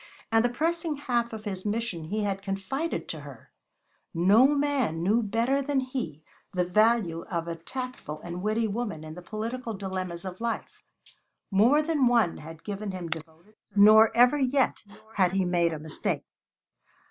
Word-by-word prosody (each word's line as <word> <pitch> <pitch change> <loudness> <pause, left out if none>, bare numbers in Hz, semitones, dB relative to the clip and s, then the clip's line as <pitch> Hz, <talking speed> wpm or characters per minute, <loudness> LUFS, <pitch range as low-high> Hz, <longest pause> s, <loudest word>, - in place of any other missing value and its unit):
And 225 0 +4
the 245 - +3
pressing 325 +5 -1
half 245 -5 -1
of 220 -1 -8
his 190 -3 -4
mission 210 -6 -2
he 210 +6 -2
had 195 -1 -2
confided 200 - -3
to - - -4
her! - - -12 0.6
No 200 +9 +6
man 280 - 0
knew 215 +6 +3
better 230 +6 +1
than 280 0 0
he 250 - -4 0.3
the 180 -1 +2
value 210 -3 +2
of 170 -2 -2
a 170 - -3
tactful 250 - -6
and 175 +1 -5
witty 215 +2 +1
woman 210 -7 -3
in 155 0 -8
the 180 - -9
political 225 +4 -4
dilemmas 185 -2 -4
of 185 +2 -7
life; 230 -1 -4 0.7
more 240 +10 +5
than 300 -5 +2
one 235 -8 +3
had 160 +1 -11
given 205 0 -4
him 180 -3 -5
devoted 160 +3 -6
service, - - -42 0.2
nor 215 +2 +8
ever 250 +4 +6
yet 265 0 +1 0.3
had 185 -2 +3
he 190 -1 +1
made 175 -1 +2
a 160 - -3
mistake. 155 +1 -2
210 Hz, 170 wpm, -27 LUFS, 175-245 Hz, 0.7 s, nor